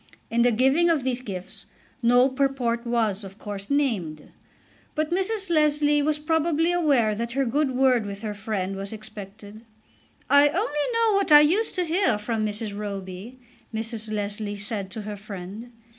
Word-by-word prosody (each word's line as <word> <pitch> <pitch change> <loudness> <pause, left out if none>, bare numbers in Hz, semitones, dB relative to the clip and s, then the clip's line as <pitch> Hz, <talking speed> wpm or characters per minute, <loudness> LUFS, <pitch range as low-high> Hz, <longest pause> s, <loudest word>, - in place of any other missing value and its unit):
In 235 +1 +2
the 245 - +5
giving 270 +9 +3
of 315 -6 +2
these 255 -1 -1
gifts 185 -6 -7 0.3
no 245 +2 +5
purport 255 -3 -1
was, 220 -4 0
of 195 0 -10
course, 200 -2 -7
named, 215 - -1 0.6
but 310 +1 -1
Mrs. 385 +1 -1
Leslie 295 -2 +3
was 300 +1 +1
probably 320 +1 +1
aware 280 -11 +2
that 235 +2 -4
her 270 +1 +1
good 280 +4 +1
word 255 -4 +3
with 200 +1 -7
her 210 -1 -3
friend 200 -2 -3
was 195 0 -5
expected. 215 -1 -9 0.7
"I 285 +1 +6
only 295 0 -1
know 460 -2 +3
what 395 -4 +1
I 295 0 +10
used 370 +10 +2
to 365 -2 0
hear 330 - +2
from 215 +1 -2
Mrs. 210 0 -2
Roby," 200 +2 -6 0.3
Mrs. 220 -1 -4
Leslie 205 0 -3
said 205 -1 -2
to 215 +3 -6
her 210 0 -5
friend. 200 +3 -8
235 Hz, 165 wpm, -25 LUFS, 205-295 Hz, 0.7 s, I